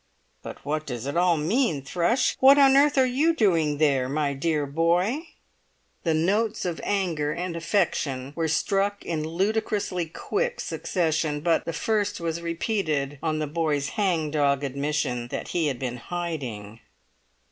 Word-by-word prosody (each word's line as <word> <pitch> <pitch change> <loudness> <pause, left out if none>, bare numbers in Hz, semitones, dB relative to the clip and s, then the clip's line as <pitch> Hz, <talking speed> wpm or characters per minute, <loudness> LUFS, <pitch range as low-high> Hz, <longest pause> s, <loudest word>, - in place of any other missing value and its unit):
"But - - -10
what 155 +1 -2
does 120 -2 -5
it 140 - -3
all 175 -1 +3
mean, 165 - 0
Thrush? 175 - +1
What 270 +2 +7
on 270 -1 +6
earth 285 +1 +4
were 260 - +6
you 290 +7 +2
doing 165 - +2
there, 140 -4 +2
my 145 0 0
dear 150 +1 0
boy?" 175 - +1 0.7
The 165 -2 +1
notes 205 +7 +1
of 175 -2 -3
anger 170 -7 0
and 175 +1 -4
affection 160 -7 -1
were 165 -1 0
struck 200 +5 0
in 160 -2 -2
ludicrously 195 +1 -1
quick 475 - -2
succession; 155 -4 -1
but 165 0 +1
the - - -2
first 205 +3 -1
was 170 0 -3
repeated 160 -5 -2
on 155 -1 -1
the 155 - -1
boy's 150 -2 -1
hang 170 -7 0
dog 140 -2 +1
admission 140 -3 -2
that - - -5
he 170 -3 0
had 135 -4 -2
been 125 -1 -4
hiding. 125 -10 -5
165 Hz, 155 wpm, -25 LUFS, 145-200 Hz, 0.7 s, What